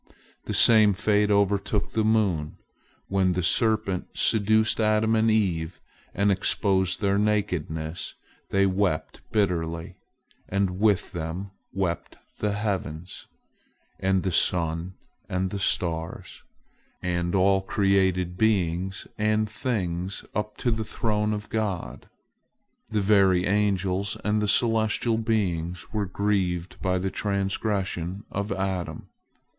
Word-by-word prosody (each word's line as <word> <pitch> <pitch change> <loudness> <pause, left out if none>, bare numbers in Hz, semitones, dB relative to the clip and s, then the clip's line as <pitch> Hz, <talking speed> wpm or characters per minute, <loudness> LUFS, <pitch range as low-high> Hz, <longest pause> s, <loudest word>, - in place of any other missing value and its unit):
The - - -3
same 110 -3 +6
fate 105 +1 +2
overtook 100 0 +1
the 110 - +1
moon. 100 -9 +1 0.5
When 95 -2 +2
the 90 0 -1
serpent 110 -1 +1
seduced 110 +1 +3
Adam 110 +1 +3
and 110 0 +3
Eve, 90 -6 0 0.4
and 100 +1 +3
exposed 95 -1 +1
their 100 -1 +2
nakedness, 90 -6 -1 0.3
they 100 0 +3
wept 95 -4 -1
bitterly, 85 -3 -1 0.5
and 95 -1 0
with 105 -2 +2
them 85 +3 -5 0.2
wept 90 -3 -3 0.2
the 105 -1 0
heavens, 95 -5 -4 0.7
and 95 -1 +1
the 95 - 0
sun 85 +1 0 0.3
and 95 0 -1
the 100 - -3
stars, 80 -4 -2 0.6
and 85 0 -1
all 95 +1 +4
created 95 -3 +1
beings 95 -3 0
and 110 0 +2
things 95 -6 -3
up 105 0 -3
to 120 - 0
the 110 -1 -1
throne 105 -1 -1
of 105 0 -3
God. 105 -5 -3 0.8
The 110 -2 0
very 95 -3 +4
angels 100 -1 0
and 105 0 +2
the 105 - 0
celestial 110 +1 +2
beings 90 -6 -1
were 105 -2 -1
grieved 95 -3 -1
by 95 -1 +1
the 95 +1 -2
trans 100 -1 -1
gression 95 -2 -2
of 100 +1 -3
Adam. 95 -2 -3
100 Hz, 120 wpm, -26 LUFS, 90-105 Hz, 0.8 s, same